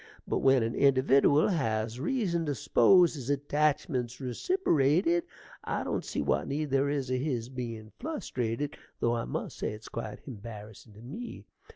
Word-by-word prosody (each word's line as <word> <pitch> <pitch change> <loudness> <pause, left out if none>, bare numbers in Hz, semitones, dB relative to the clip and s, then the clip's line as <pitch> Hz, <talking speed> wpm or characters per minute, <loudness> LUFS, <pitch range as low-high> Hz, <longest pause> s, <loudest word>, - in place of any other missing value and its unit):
But - - 0
when 135 -3 +4
an 115 +1 -1
individdiwal 140 +4 +4
has 110 -4 -1
reason 170 - 0
to 145 - 0
s'pose 170 - +5
his 135 -4 -6
attachment's 145 -3 0
reciperated, 170 - +2 0.4
I - - -2
don't - - -2
see - - -2
what - - 0
need 145 +1 -2
there 135 +1 +2
is 140 -3 -2
o' 130 - +2
his 125 -4 -2
bein' 115 -4 -6
flustrated, 145 - -3 0.2
though 120 0 +2
I 115 - -2
must - - -5
say - - -2
it's 105 +1 -10
quite 110 - -6
embarrassin' 110 -3 -10
to 110 - -13
me. 195 - -8
135 Hz, 160 wpm, -30 LUFS, 115-150 Hz, 0.4 s, s'pose